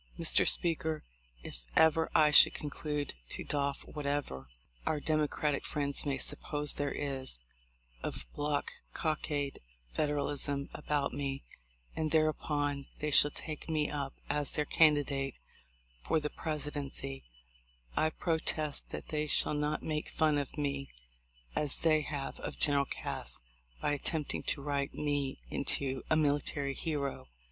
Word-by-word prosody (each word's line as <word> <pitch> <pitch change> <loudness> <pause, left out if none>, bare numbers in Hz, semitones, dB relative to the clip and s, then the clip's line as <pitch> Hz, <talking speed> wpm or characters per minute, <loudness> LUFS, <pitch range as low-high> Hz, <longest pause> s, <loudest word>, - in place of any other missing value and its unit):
Mr. - - +3
Speaker, 160 -2 +3 0.4
if - - -8
ever 160 0 +5
I 150 -1 +6
should - - +9
conclude 150 -1 -3 0.2
to - - +1
doff 140 -1 -1
whatever 140 - -3 0.3
our 155 - 0
Democratic 150 -1 0
friends 140 0 0
may 140 -1 +1
suppose 145 +2 0
there 145 -1 -1
is 135 - -1 0.6
of 65 -1 -4
black 145 -1 -1 0.2
cockade 150 -3 -1 0.3
Federalism 145 - 0
about 145 -1 -1
me, 140 -1 -3 0.5
and, 155 -1 0
thereupon 145 -2 +1
they 150 0 -2
shall 145 - +8
take 155 +2 -7
me 155 -2 +1
up 140 -2 -3
as 145 -1 +1
their 150 - 0
candidate 145 -4 +3 0.7
for 160 - +3
the 150 -1 -3
Presidency, 145 -3 -2 0.7
I 155 - +3
protest 155 -2 -1
that - - -7
they 150 0 -1
shall 150 - +3
not 150 +1 -1
make 150 -1 -2
fun 155 -2 +2
of 145 +2 -5
me 140 -2 -2 0.7
as 145 -2 +2
they 155 -2 +3
have 145 -2 -4
of - - -5
General 140 -2 +4
Cass - - -4 0.4
by - - 0
attempting 150 +1 -1
to 140 - 0
write 140 -1 -1
me 145 -2 -1
into 135 -1 -1
a - - +5
military 145 -2 +1
hero." 140 - -3
145 Hz, 135 wpm, -33 LUFS, 140-150 Hz, 0.7 s, should